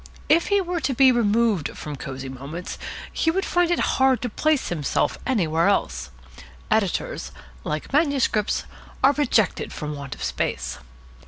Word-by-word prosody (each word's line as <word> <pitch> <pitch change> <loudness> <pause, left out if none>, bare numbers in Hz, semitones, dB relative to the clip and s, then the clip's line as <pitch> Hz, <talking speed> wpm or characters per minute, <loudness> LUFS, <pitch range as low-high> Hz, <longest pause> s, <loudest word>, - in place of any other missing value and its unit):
If 330 +3 +4
he 405 -1 +3
were 355 -1 -2
to 275 -4 -1
be 265 +1 +7
removed 225 - +1
from 150 -1 -6
Cosy 135 0 -6
Moments 140 +7 -7 0.3
he 325 - +1
would 380 +4 0
find 350 -1 +2
it 345 - +2 0.2
hard 265 -1 +5
to 245 - -1
place 305 +5 +1
himself 155 -5 0
anywhere 170 -8 +2
else. 200 - 0 0.6
Editors, 220 - 0 0.3
like - - -4
manuscripts, 275 -8 +2 0.4
are 275 +2 +6
rejected 245 -8 +1
from 150 -1 -5
want 140 -2 -6
of - - -8
space. 65 -1 -2
230 Hz, 150 wpm, -24 LUFS, -, 0.6 s, be